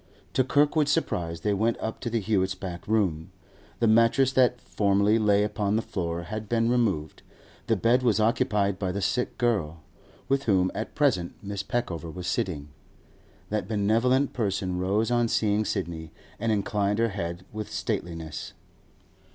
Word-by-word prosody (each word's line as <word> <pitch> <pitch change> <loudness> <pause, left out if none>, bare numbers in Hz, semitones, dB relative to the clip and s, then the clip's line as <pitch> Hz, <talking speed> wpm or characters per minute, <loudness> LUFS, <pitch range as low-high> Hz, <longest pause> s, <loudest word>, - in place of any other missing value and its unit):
To 130 - +3
Kirkwood's 145 +2 +2
surprise, 85 - -1
they 105 +2 +1
went 110 +4 +1
up 110 - -4
to 120 - -3
the 115 0 0
Hewetts' 95 -3 0
back 90 -2 -6
room. 95 -7 0 0.5
The 120 - +1
mattress 115 +4 +4
that 125 -1 +3
formerly 100 +1 +2
lay 105 -1 +3
upon 105 -1 0
the 110 - +1
floor 85 -2 -3
had 110 +5 -6
been 115 0 +2
removed; 100 -12 0 0.5
the - - +3
bed 120 +3 +3
was 115 -4 +2
occupied 105 -4 +1
by 95 -2 -1
the 100 - -3
sick 100 +7 -1
girl, 85 -10 0 0.4
with 135 0 +1
whom 95 -4 +3
at 110 - -5
present 115 -13 +1
Mrs. 100 -1 -4
Peckover 85 -9 -2
was 90 +1 -7
sitting. 80 -5 -2 0.8
That 105 0 -1
benevolent 115 +6 +2
person 95 -5 -1
rose 105 +5 +1
on 120 -1 +3
seeing 105 -1 +1
Sidney, 85 -6 -3 0.3
and 115 - 0
inclined 105 -1 0
her 115 0 +2
head 90 -3 -5
with 110 0 -5
stateliness. 85 -3 -4
105 Hz, 160 wpm, -27 LUFS, 95-115 Hz, 0.8 s, mattress